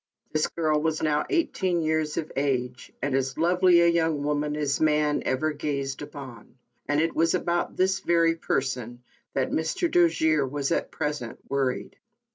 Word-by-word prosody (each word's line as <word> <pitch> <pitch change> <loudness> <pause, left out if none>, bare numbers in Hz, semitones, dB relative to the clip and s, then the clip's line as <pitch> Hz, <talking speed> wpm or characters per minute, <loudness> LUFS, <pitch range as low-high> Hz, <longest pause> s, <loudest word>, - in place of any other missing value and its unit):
This 155 0 +2
girl 155 -2 0
was 160 0 -1
now 150 -1 +1
eighteen 185 - 0
years 155 -1 0
of 155 - -3
age, 125 -3 -2
and 140 -1 0
as 135 0 -1
lovely 175 +1 +4
a 170 - +5
young 165 -3 +1
woman 150 0 -1
as 145 -2 -1
man 150 -1 +2
ever 155 +4 0
gazed 140 -3 -3
upon; 130 -6 -10 0.3
and 145 0 +1
it 165 +1 0
was 165 +2 +3
about 175 -1 -1
this 190 +1 +2
very 170 -3 +3
person 125 -6 -3 0.3
that 135 -1 0
Mr. 160 - -1
Dojere 160 -4 +3
was 140 +1 -2
at - - 0
present 150 -6 -4
worried. 135 -2 -2
150 Hz, 160 wpm, -26 LUFS, 140-165 Hz, 0.3 s, a